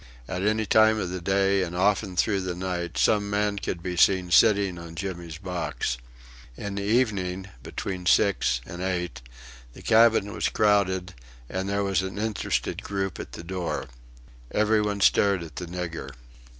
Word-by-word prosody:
At 90 Hz, -, -3 dB
any 110 Hz, +2 st, +1 dB
time 110 Hz, +1 st, +5 dB
of 95 Hz, -4 st, -2 dB
the 90 Hz, -1 st, -4 dB
day 95 Hz, +1 st, +2 dB
and 90 Hz, -1 st, -3 dB
often 100 Hz, 0 st, +1 dB
through 100 Hz, +2 st, +1 dB
the 90 Hz, -1 st, -3 dB
night 90 Hz, -1 st, -3 dB
some 105 Hz, -1 st, +2 dB
man 100 Hz, 0 st, 0 dB
could 85 Hz, -3 st, -4 dB
be 90 Hz, -1 st, -3 dB
seen 90 Hz, 0 st, +3 dB
sitting 100 Hz, -2 st, +4 dB
on 85 Hz, -1 st, -10 dB
Jimmy's 85 Hz, -3 st, -5 dB
box. 80 Hz, -9 st, -3 dB, 0.6 s
In 100 Hz, -1 st, -5 dB
the 100 Hz, -, -3 dB
evening, 100 Hz, -4 st, 0 dB
between 90 Hz, -2 st, -5 dB
six 90 Hz, -, +3 dB
and 85 Hz, +4 st, -8 dB
eight, 90 Hz, -8 st, -2 dB, 0.5 s
the -, -, -13 dB
cabin 110 Hz, -2 st, +4 dB
was -, -, 0 dB
crowded, 100 Hz, -3 st, +2 dB, 0.3 s
and 95 Hz, +5 st, -3 dB
there 100 Hz, 0 st, 0 dB
was 95 Hz, -1 st, +1 dB
an 95 Hz, +1 st, -5 dB
interested 110 Hz, -1 st, -2 dB
group 95 Hz, -3 st, -3 dB
at -, -, -8 dB
the -, -, -8 dB
door. 90 Hz, -4 st, -3 dB, 0.6 s
Every 105 Hz, 0 st, +2 dB
one 105 Hz, -1 st, -2 dB
stared 100 Hz, -2 st, +4 dB
at 80 Hz, -3 st, -11 dB
the 90 Hz, -, -5 dB
nigger. 85 Hz, -5 st, -5 dB
95 Hz, 165 wpm, -26 LUFS, 90-100 Hz, 0.6 s, time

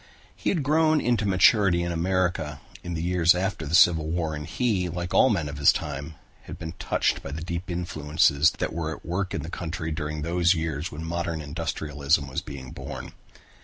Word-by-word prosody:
He -, -, -2 dB
had 165 Hz, -7 st, 0 dB
grown 155 Hz, +2 st, +3 dB
into 120 Hz, -5 st, +1 dB
maturity 95 Hz, -1 st, +4 dB
in 85 Hz, -, -2 dB
America 85 Hz, -4 st, -1 dB, 0.2 s
in 85 Hz, -1 st, -4 dB
the 80 Hz, -, -3 dB
years 90 Hz, -1 st, +4 dB
after 95 Hz, -3 st, -2 dB
the 80 Hz, -, +1 dB
Civil 80 Hz, -2 st, +5 dB
War 80 Hz, -1 st, -1 dB
and 75 Hz, -1 st, -6 dB
he, 100 Hz, -5 st, 0 dB
like 85 Hz, +1 st, -4 dB
all 130 Hz, -, +6 dB
men 90 Hz, -9 st, 0 dB
of 70 Hz, 0 st, -6 dB
his 70 Hz, -, +7 dB
time, 70 Hz, +3 st, -5 dB, 0.3 s
had -, -, -8 dB
been 80 Hz, 0 st, -6 dB
touched -, -, 0 dB
by -, -, -7 dB
the 75 Hz, +3 st, -5 dB
deep 85 Hz, +2 st, -5 dB
influences 80 Hz, -3 st, +2 dB
that -, -, -2 dB
were 80 Hz, -2 st, -2 dB
at -, -, -17 dB
work 90 Hz, +3 st, -2 dB
in -, -, -3 dB
the 80 Hz, -, -6 dB
country 80 Hz, -2 st, -4 dB
during 75 Hz, -1 st, -3 dB
those 85 Hz, +2 st, +2 dB
years 80 Hz, +1 st, -3 dB
when 75 Hz, +2 st, -7 dB
modern 85 Hz, 0 st, -2 dB
industrialism 75 Hz, -2 st, -1 dB
was 65 Hz, -, -3 dB
being 65 Hz, -3 st, -9 dB
born. -, -, -7 dB
85 Hz, 200 wpm, -26 LUFS, 75-90 Hz, 0.3 s, his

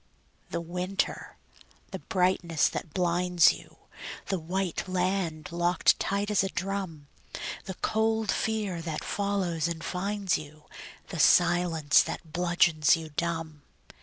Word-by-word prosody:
The -, -, -3 dB
winter! 180 Hz, +3 st, -3 dB, 0.5 s
the -, -, -5 dB
brightness 180 Hz, -3 st, +1 dB
that 160 Hz, -, -6 dB
blinds 175 Hz, 0 st, +3 dB
you, -, -, -13 dB, 0.5 s
The 190 Hz, -, 0 dB
white 180 Hz, +2 st, -2 dB
land 180 Hz, -4 st, -1 dB
locked 175 Hz, 0 st, +2 dB
tight 200 Hz, +1 st, -1 dB
as 205 Hz, -1 st, +3 dB
a 195 Hz, -, -1 dB
drum, 190 Hz, -7 st, -4 dB, 0.6 s
The 190 Hz, -, -5 dB
cold 220 Hz, 0 st, +1 dB
fear 210 Hz, -6 st, -1 dB
that 160 Hz, -2 st, -4 dB
follows 190 Hz, -5 st, -1 dB
and 165 Hz, -1 st, -5 dB
finds 195 Hz, +2 st, -1 dB
you, 150 Hz, 0 st, -12 dB, 0.5 s
The 170 Hz, -, -5 dB
silence 170 Hz, -3 st, +4 dB
that 160 Hz, -2 st, -6 dB
bludgeons 170 Hz, -3 st, +3 dB
you 160 Hz, -1 st, -7 dB
dumb. 165 Hz, -1 st, -3 dB
175 Hz, 125 wpm, -28 LUFS, 165-195 Hz, 0.6 s, silence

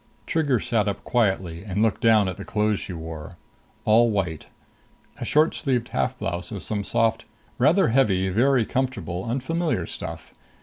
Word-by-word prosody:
Trigger 145 Hz, -7 st, +1 dB
sat 110 Hz, -2 st, 0 dB
up 100 Hz, -1 st, -3 dB
quietly 95 Hz, -7 st, 0 dB
and 100 Hz, +1 st, -1 dB
looked 110 Hz, +2 st, +1 dB
down 110 Hz, -4 st, +5 dB
at 95 Hz, -, -3 dB
the -, -, -7 dB
clothes 105 Hz, -2 st, 0 dB
she -, -, -6 dB
wore. 80 Hz, +1 st, -7 dB, 0.5 s
All 115 Hz, +2 st, +5 dB
white. 90 Hz, -7 st, -2 dB, 0.7 s
A -, -, -4 dB
short 155 Hz, +2 st, +3 dB
sleeved 125 Hz, -5 st, -1 dB
half 65 Hz, -1 st, -1 dB
blouse 90 Hz, +2 st, -4 dB
of 100 Hz, -4 st, -6 dB
some 105 Hz, -2 st, -2 dB
soft, 115 Hz, +2 st, +1 dB, 0.3 s
rather 160 Hz, +8 st, +4 dB
heavy, 105 Hz, -7 st, +2 dB
very 120 Hz, +4 st, +3 dB
comfortable 100 Hz, -10 st, -2 dB
unfamiliar 135 Hz, -, -1 dB
stuff. 85 Hz, -1 st, -7 dB
110 Hz, 160 wpm, -24 LUFS, 95-125 Hz, 0.7 s, down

